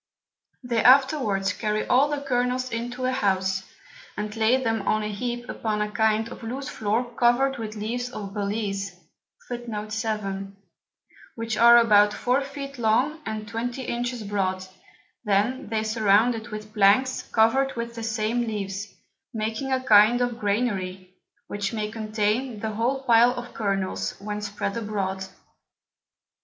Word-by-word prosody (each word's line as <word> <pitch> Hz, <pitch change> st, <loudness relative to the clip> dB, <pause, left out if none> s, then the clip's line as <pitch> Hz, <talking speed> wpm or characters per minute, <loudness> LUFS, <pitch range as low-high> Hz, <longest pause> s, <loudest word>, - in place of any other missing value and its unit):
They 235 Hz, -2 st, 0 dB
afterwards 250 Hz, -8 st, +4 dB
carry 215 Hz, 0 st, -1 dB
all 275 Hz, +4 st, +4 dB
the 295 Hz, -1 st, -2 dB
Kernels 255 Hz, -1 st, -1 dB
into 245 Hz, +2 st, -3 dB
a 255 Hz, -, +1 dB
House, 190 Hz, -6 st, 0 dB, 0.6 s
and 210 Hz, +1 st, -4 dB
lay 225 Hz, +3 st, +3 dB
them 225 Hz, -4 st, -1 dB
on 215 Hz, 0 st, +2 dB
a 210 Hz, -, -2 dB
heap 240 Hz, +3 st, -4 dB
upon 215 Hz, -2 st, -2 dB
a 210 Hz, 0 st, -1 dB
kind 220 Hz, +1 st, +2 dB
of -, -, -10 dB
loose 255 Hz, +4 st, -5 dB
Floor 220 Hz, +3 st, -1 dB
cover'd 245 Hz, +3 st, +2 dB
with 220 Hz, -1 st, -5 dB
Leaves 240 Hz, +4 st, -3 dB
of 205 Hz, -5 st, -7 dB
Balize, 200 Hz, -1 st, -3 dB, 2.4 s
which 230 Hz, -1 st, -3 dB
are 235 Hz, +2 st, +8 dB
about 210 Hz, -3 st, +5 dB
four 250 Hz, +3 st, +1 dB
Feet 275 Hz, -1 st, -7 dB
long, 245 Hz, +8 st, +2 dB
and 215 Hz, -1 st, -4 dB
twenty 240 Hz, +3 st, -4 dB
Inches 240 Hz, -1 st, -3 dB
broad; 190 Hz, -2 st, -1 dB, 0.6 s
then 210 Hz, +5 st, 0 dB
they 220 Hz, -1 st, 0 dB
surround 220 Hz, +1 st, +3 dB
it 225 Hz, 0 st, -7 dB
with 215 Hz, -1 st, -8 dB
Planks 215 Hz, +5 st, +4 dB
cover'd 265 Hz, +4 st, +3 dB
with 235 Hz, 0 st, -4 dB
the 230 Hz, -, -7 dB
same 225 Hz, +1 st, -1 dB
Leaves, 200 Hz, -2 st, -4 dB, 0.4 s
making 220 Hz, +5 st, -2 dB
a 260 Hz, 0 st, +1 dB
kind 220 Hz, 0 st, +6 dB
of 245 Hz, -1 st, -1 dB
Granary, 195 Hz, -4 st, -2 dB, 0.3 s
which 205 Hz, 0 st, -3 dB
may 215 Hz, -1 st, -2 dB
contain 215 Hz, +2 st, -1 dB
the 220 Hz, +1 st, -3 dB
whole 245 Hz, +5 st, -1 dB
Pile 240 Hz, -1 st, +5 dB
of 245 Hz, 0 st, -7 dB
Kernels, 195 Hz, -3 st, -2 dB
when 210 Hz, +1 st, -4 dB
spread 205 Hz, -1 st, -3 dB
abroad. 195 Hz, -4 st, -3 dB
225 Hz, 145 wpm, -25 LUFS, 210-245 Hz, 2.4 s, are